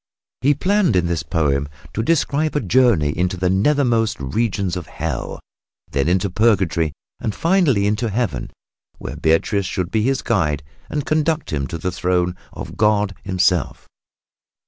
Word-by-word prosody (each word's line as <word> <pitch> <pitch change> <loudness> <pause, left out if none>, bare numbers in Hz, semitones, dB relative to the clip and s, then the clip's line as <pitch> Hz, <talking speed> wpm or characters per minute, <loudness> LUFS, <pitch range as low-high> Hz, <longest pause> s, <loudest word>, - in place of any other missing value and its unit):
He 140 +3 +3
planned 190 - +2
in 90 -1 +3
this 85 -2 -1
poem 75 -2 0 0.2
to 110 - -1
describe 155 +2 +1
a - - +3
journey 105 - +3
into 90 +1 0
the 90 0 +1
nethermost 115 0 +2
regions 95 - -1
of 90 -2 -5
Hell, 80 -6 -4 0.5
then 70 +2 0
into 90 +3 +2
Purgatory 95 -6 +2 0.3
and 110 - -3
finally 165 - +2
into 105 +3 0
Heaven, 100 - -2 0.5
where - - -6
Beatrice 90 +5 +1
should 90 0 -3
be 110 - +1
his 135 +4 0
guide 75 - 0 0.3
and 150 -2 -2
conduct 155 - 0
him 70 -2 -1
to 85 - -5
the 90 +3 -2
throne 90 0 0 0.2
of - - -8
God 105 -2 +2
Himself. 90 -4 0
95 Hz, 150 wpm, -20 LUFS, 85-120 Hz, 0.5 s, He